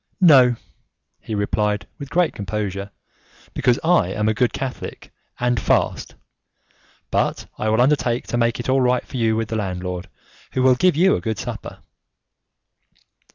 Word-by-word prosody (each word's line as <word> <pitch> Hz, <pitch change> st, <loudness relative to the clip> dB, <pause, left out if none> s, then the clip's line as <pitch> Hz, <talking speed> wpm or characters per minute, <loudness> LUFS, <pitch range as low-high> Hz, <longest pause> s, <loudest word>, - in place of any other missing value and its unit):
"No," 135 Hz, -9 st, +6 dB, 0.6 s
he 110 Hz, -, -5 dB
replied, 105 Hz, +1 st, 0 dB
with 140 Hz, -2 st, -7 dB
great 175 Hz, 0 st, +1 dB
composure, 100 Hz, -1 st, -4 dB, 0.6 s
"because 125 Hz, +1 st, +2 dB
I 170 Hz, -, +3 dB
am 105 Hz, +3 st, -1 dB
a 110 Hz, -, +3 dB
good 120 Hz, +2 st, +1 dB
Catholic 130 Hz, -2 st, -6 dB, 0.3 s
and 125 Hz, -1 st, +1 dB
fast. -, -, 0 dB, 1.0 s
But -, -, 0 dB
I 110 Hz, -, 0 dB
will 110 Hz, +1 st, +2 dB
undertake 125 Hz, -3 st, +1 dB
to -, -, -2 dB
make 115 Hz, 0 st, +1 dB
it 120 Hz, -, -4 dB
all 130 Hz, +1 st, +3 dB
right 125 Hz, 0 st, +1 dB
for -, -, -7 dB
you 110 Hz, -2 st, +2 dB
with 115 Hz, 0 st, -2 dB
the 115 Hz, -, -2 dB
landlord, 90 Hz, -2 st, -4 dB, 0.4 s
who 130 Hz, -, +1 dB
will 130 Hz, 0 st, +6 dB
give 180 Hz, +7 st, +3 dB
you 185 Hz, +5 st, +4 dB
a -, -, -3 dB
good 110 Hz, -2 st, -2 dB
supper." -, -, -7 dB
120 Hz, 155 wpm, -21 LUFS, 105-130 Hz, 1.0 s, No